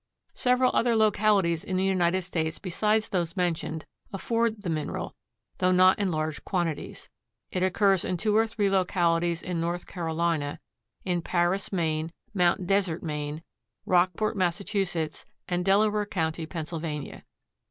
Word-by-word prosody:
Several 250 0 +2
other 235 -1 +3
localities 205 -6 +3
in 185 - -2
the 185 - +1
United 185 -1 +2
States 160 -3 -2
besides 210 +4 0
those 170 -1 -2
mentioned 165 -3 -1 0.3
afford 225 +1 -1
the 180 - -2
mineral, 155 -2 -3 0.5
though 185 0 +3
not 185 +1 +5
in 200 -2 +1
large 155 -2 -2
quantities. 170 -5 -3 0.4
It 185 - -2
occurs 190 0 +3
in 185 - -1
two 210 +4 +1
or 225 +1 +4
three 215 -2 0
localities 175 -3 +1
in 175 -2 -2
North 175 +1 -2
Carolina; 165 -4 -2 0.5
in 175 -2 0
Paris, 175 +3 0
Maine; 160 -3 -1 0.2
Mount 180 -1 +2
Desert, 185 -3 +1
Maine; 150 0 -4 0.4
Rockport, 185 +5 +2
Massachusetts; 180 -3 -1 0.2
and 180 0 -1
Delaware 210 +2 +3
county, 160 -4 -2
Pennsylvania. 155 -3 -5
180 Hz, 135 wpm, -27 LUFS, 165-195 Hz, 0.5 s, not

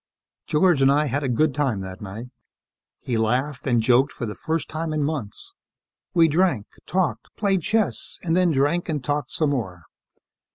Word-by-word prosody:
George 160 -1 +3
and 135 0 +6
I 150 +2 +3
had 145 +1 -1
a 135 - -1
good 145 +4 +2
time 130 -9 0
that 95 -1 -8
night. 105 +5 -7 0.7
He 120 -3 -1
laughed 125 +4 -1
and 120 -2 +3
joked 130 +4 +4
for 120 - -5
the 105 - -4
first 160 +4 -2
time 160 0 -3
in 150 -1 0
months. 140 -9 -4 0.6
We 165 -1 +6
drank, 160 - +1 0.2
talked, 180 -2 -1
played 195 -3 +1
chess, 215 +5 -1
and 165 -2 +1
then 180 -1 +3
drank 150 +5 +1
and 150 -4 -2
talked 145 -1 -1
some 155 -3 0
more. 95 -11 -3
145 Hz, 175 wpm, -23 LUFS, 120-160 Hz, 0.7 s, and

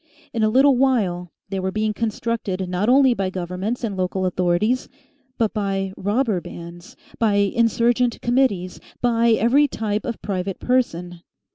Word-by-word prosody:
In 230 - -1
a 215 - +3
little 265 +4 +5
while 195 -10 +1 0.2
they 195 0 -2
were 190 0 -2
being 215 +1 -1
constructed 215 -4 -2
not 180 +5 0
only 265 0 +5
by 195 -4 -2
governments 185 +6 -4
and 210 -4 -2
local 185 0 -1
authorities, 185 +7 0 0.5
but 225 -3 0
by 195 -2 -2
robber 205 -1 0
bands, 170 +2 -10 0.2
by 220 -3 +2
insurgent 235 +3 +2
committees, 235 -8 0 0.2
by 235 -1 +3
every 255 +7 +4
type 215 -4 -2
of 235 - -4
private 195 -1 -3
person. 175 -9 -1
210 Hz, 145 wpm, -22 LUFS, 185-235 Hz, 0.5 s, little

